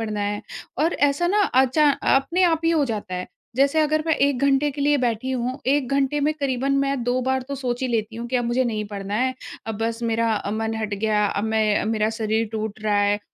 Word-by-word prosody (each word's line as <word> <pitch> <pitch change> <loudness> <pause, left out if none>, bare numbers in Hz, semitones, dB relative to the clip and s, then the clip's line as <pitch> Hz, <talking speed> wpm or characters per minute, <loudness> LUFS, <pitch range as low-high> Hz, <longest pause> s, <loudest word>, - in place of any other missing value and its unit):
पढ़ना 215 -2 -3
है 205 0 -2 0.4
और 325 +3 +2
ऐसा 285 +5 0
ना 410 +3 +3
अचा 265 +4 +4 0.3
अपने 335 +7 +1
आप 325 -2 +2
ही 330 - +4
हो 315 -3 +3
जाता 210 -7 -4
है। 180 0 -4 0.3
जैसे 280 +3 +3
अगर 310 0 +2
मैं 320 - +3
1 280 -2 +2
घंटे 280 +1 +3
के 285 +1 -7
लिए 290 +1 +3
बैठी 245 0 -1
हूँ, 255 +1 -2
1 275 -1 +2
घंटे 280 +1 +1
में 295 +2 +2
करीबन 275 -2 -1
मैं 275 -2 0
2 245 +1 +1
बार 260 0 0
तो 280 - -3
सोच 250 -3 -3
ही 260 - 0
लेती 225 -1 -2
हूँ 235 +1 -5
कि 255 - 0
अब 245 - 0
मुझे 240 +2 +1
नहीं 215 -3 -2
पढ़ना 200 -1 -5
है, 255 +4 +1 0.3
अब 225 -1 -3
बस 230 +1 -2
मेरा 230 0 +1 0.2
मन 220 +1 -2
हट 215 -2 -2
गया, 210 0 +1
अब 200 +1 -2
मैं 220 -2 +1
मेरा 215 -1 +1
शरीर 220 0 0
टूट 220 -1 -4
रहा 210 -1 +2
है 205 0 +2
245 Hz, 235 wpm, -23 LUFS, 220-280 Hz, 0.4 s, अचा